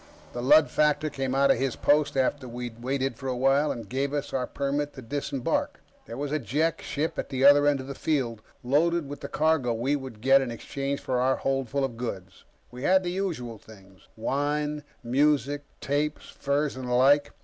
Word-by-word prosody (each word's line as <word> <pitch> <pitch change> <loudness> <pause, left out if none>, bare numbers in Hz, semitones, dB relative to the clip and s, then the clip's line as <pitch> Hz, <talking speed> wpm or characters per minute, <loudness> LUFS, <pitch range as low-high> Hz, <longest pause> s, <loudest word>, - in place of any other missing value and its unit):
The 120 - -4
Lud 145 +4 +5
factor 150 0 +2
came 135 -1 -2
out 140 0 +4
of - - +2
his 135 -2 -1
post 150 -1 +2
after 130 0 0
we'd 120 -1 -7
waited 135 -1 -1
for 135 - -5
a 130 -1 -1
while, 135 +3 +3
and 115 - -6
gave 135 +2 -2
us 145 -1 -3
our 125 -2 -1
permit 145 +1 -2
to 130 - -8
disembark. 140 +1 -2 0.3
There 115 - -7
was 145 0 -3
a 155 - 0
Jek 150 +7 0
ship 155 +3 -3
at - - -4
the 135 0 +1
other 145 +1 +7
end 145 -1 +3
of 130 - -6
the 140 - -6
field, 130 -7 -1 0.2
loaded 155 +5 +2
with 145 +1 -7
the - - -5
cargo 150 -6 +1
we 130 +6 0
would 130 -6 -7
get 135 +4 +5
in 130 - -3
exchange 140 +4 -4
for 125 -1 -1
our 130 +1 +2
holdful 135 0 -1
of 125 -4 -3
goods. 95 -6 -6 0.3
We 125 +1 -9
had 190 +6 +4
the 175 - -2
usual 160 - -3
things; 95 -4 -17
wine, 150 +5 -1 0.2
music 145 +2 +1 0.2
tapes, 145 +2 -2
furs, 140 0 -1
and 130 -1 -6
the 125 - -1
like. 140 +3 +4
135 Hz, 205 wpm, -27 LUFS, 125-145 Hz, 0.3 s, other